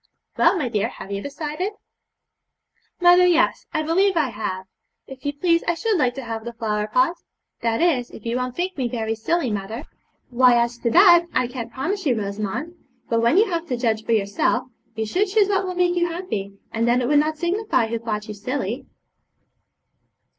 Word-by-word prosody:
'Well, - - +4
my 295 -7 -1
dear, 215 -4 0
have 195 - -10
you 200 0 -3
decided?' 305 - -4 1.3
'Mother! 355 0 +6
yes, 340 -1 +2
I 310 -1 -1
believe 370 +4 +2
I 300 -5 +2
have. 190 -4 -4 0.4
If 265 -1 -12
you - - +1
please, 335 +3 +1
I 340 - +2
should 445 +5 0
like 250 -8 +1
to 270 - -6
have 225 -1 -5
the 235 +1 -6
flower 210 -2 -2
pot; 335 +9 +2 0.4
that 230 +6 +1
is, 260 -9 +1
if 220 - -13
you 230 +1 -1
won't 250 0 -3
think 370 +1 -2
me 250 - +1
very 225 -2 -2
silly, 250 +4 -1
mother.' 210 +5 -4 0.5
'Why, 250 0 +5
as 235 0 -1
to 235 - 0
that, 345 - +6
I - - +3
can't 240 -2 -6
promise 350 - -3
you, 240 -4 +2
Rosamond; 215 - -4 0.4
but, 230 -1 +2
when 235 +9 +3
you 415 -1 +4
have 335 0 -2
to 250 - -2
judge 225 -3 0
for 230 - 0
yourself, 200 +3 +1 0.3
you 220 0 -2
should 370 - 0
choose 405 +1 +3
what 390 -1 +1
will 365 - -4
make 355 0 +2
you 345 0 +2
happy, 215 - -5
and 230 +1 0
then 245 +1 +3
it - - 0
would 290 +1 +4
not 310 +1 0
signify 355 - 0
who 230 +1 -3
thought 215 -2 -4
you 215 - -5
silly.' 240 +3 -4
255 Hz, 200 wpm, -22 LUFS, 225-345 Hz, 1.3 s, Mother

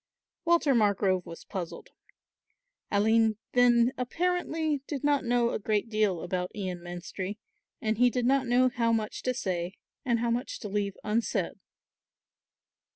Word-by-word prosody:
Walter 335 -4 +4
Margrove 200 -5 +2
was 165 - -9
puzzled. 180 -4 -6 1.0
Aline 220 +1 +3
then 245 0 +4
apparently 320 +1 0
did 285 -3 -4
not 290 -1 +2
know 240 -1 +2
a - - -2
great 215 +1 0
deal 210 -6 +1
about 180 0 -2
Ian 185 -4 -3
Menstrie 175 +3 -6 0.4
and 220 0 -1
he 250 0 +6
did 245 0 -1
not 265 0 +3
know 250 +1 +4
how 235 -2 +1
much 220 -2 -1
to 255 - 0
say 180 -4 -2 0.3
and 240 -4 +2
how 235 0 0
much 245 +3 -2
to 210 - -4
leave 200 -1 -2
unsaid. 220 +2 -1
230 Hz, 145 wpm, -29 LUFS, 200-250 Hz, 1.0 s, he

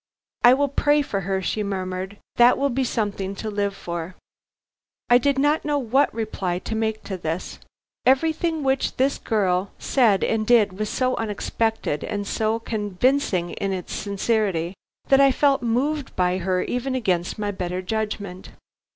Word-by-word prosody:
"I 245 +1 +8
will 285 +1 +1
pray 290 +2 +2
for 200 -7 -2
her," 190 0 -2
she 215 - -1
murmured; 190 0 -4 0.2
"that 240 +1 +6
will 280 0 +1
be 265 +2 0
something 200 -5 -2
to 215 +2 -5
live 200 -1 -1
for." 170 0 -5 1.0
I 245 - +8
did 280 +2 +1
not 295 +3 +2
know 295 -1 0
what 270 +2 +2
reply 200 -5 -2
to 190 - -5
make 220 0 -1
to 190 - -5
this. 165 +1 -4 0.4
Everything 320 +4 +2
which 265 0 0
this 270 +2 +1
girl 190 -4 0
said 225 -8 +2
and 220 -1 0
did 210 -5 +4
was 215 -1 -1
so 255 -1 0
unexpected 225 -5 -1
and 205 -1 -3
so 220 +2 0
convincing 210 -3 0
in 195 -1 -2
its 185 -2 -5
sincerity, 200 -4 -1 0.4
I 275 0 +6
felt 275 +1 +2
moved 265 +5 -1
by 180 0 +1
her 185 0 0
even 255 +2 -2
against 185 -8 -1
my 205 -1 -2
better 185 -1 -4
judgment. 205 -2 -4
215 Hz, 160 wpm, -23 LUFS, 190-260 Hz, 1.0 s, I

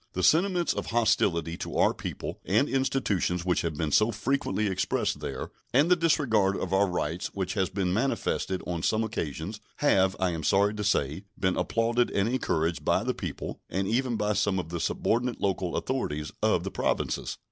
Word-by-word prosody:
The 95 - -2
sentiments 175 - +3
of - - -4
hostility 100 -8 +1
to - - -5
our - - +4
people - - -6
and 110 +9 +2
institutions 105 -10 0
which 90 -1 +2
have 80 -2 -2
been 75 0 -2
so 110 +9 +4
frequently 115 0 -1
expressed 95 -2 0
there, - - -5 0.2
and 150 +6 +4
the - - +8
disregard 120 - +2
of 95 - -3
our 100 +1 +4
rights 90 -1 -2
which 95 -1 -2
has 95 -3 0
been 95 -2 -1
manifested 110 -5 -1
on 85 -2 -3
some 110 +6 +1
occasions, 100 -1 -4
have, 95 -10 +3
I 95 -1 +1
am 80 -1 -3
sorry 100 +6 +3
to 105 -1 -4
say, 95 -2 0
been 95 -1 +1
applauded 115 +1 +1
and 100 +1 +1
encouraged 85 -9 0
by - - +2
the - - 0
people, - - -5
and 95 +2 -1
even 120 +2 +1
by 105 -1 0
some 100 -1 +1
of 90 -3 -3
the 85 0 -3
subordinate 120 +6 0
local 95 -3 -1
authorities, 75 - -2
of - - +2
the - - -4
Provinces. - - -1
100 Hz, 185 wpm, -28 LUFS, 90-115 Hz, 0.2 s, the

